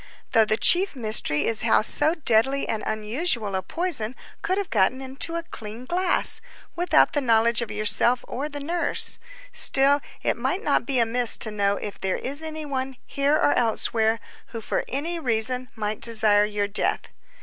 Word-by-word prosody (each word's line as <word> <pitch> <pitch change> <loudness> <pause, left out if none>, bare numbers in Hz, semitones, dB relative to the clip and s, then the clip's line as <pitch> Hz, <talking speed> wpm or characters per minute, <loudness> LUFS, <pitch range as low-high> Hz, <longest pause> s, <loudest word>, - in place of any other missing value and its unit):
Though 225 -1 +4
the 215 0 0
chief 365 +5 +2
mystery 215 - 0
is 225 -1 0
how 220 -1 +3
so 300 +8 +2
deadly 270 -2 +1
and 220 - -2
unusual 215 - -1
a 190 - -1
poison 255 - -2 0.3
could 375 - -1
have 400 -2 -4
gotten 220 +4 +2
into 270 +5 -3
a 335 - -3
clean 225 -6 -10
glass, 360 +5 +3 0.3
without 350 -1 +3
the 290 - 0
knowledge 235 -1 +2
of 235 - -4
yourself 215 +3 +2
or 285 +4 -4
the 290 -1 -7
nurse, 335 +4 0 0.3
still 285 - +4 0.2
it - - 0
might 390 +4 -2
not - - 0
be 275 -2 0
amiss 235 0 +2
to 220 - -2
know 200 -1 0
if 205 0 -7
there 190 -1 -1
is 280 +4 -3
any 315 -1 -6
one, 265 -2 -4
here 280 +2 0
or 300 - +2
elsewhere, 225 -1 +1 0.3
who 230 - -7
for 220 - -2
any 330 +6 -3
reason 250 -1 +1
might 215 -1 -4
desire 215 -3 +3
your 205 -1 -2
death." 205 - -1
245 Hz, 175 wpm, -24 LUFS, 215-290 Hz, 0.3 s, Though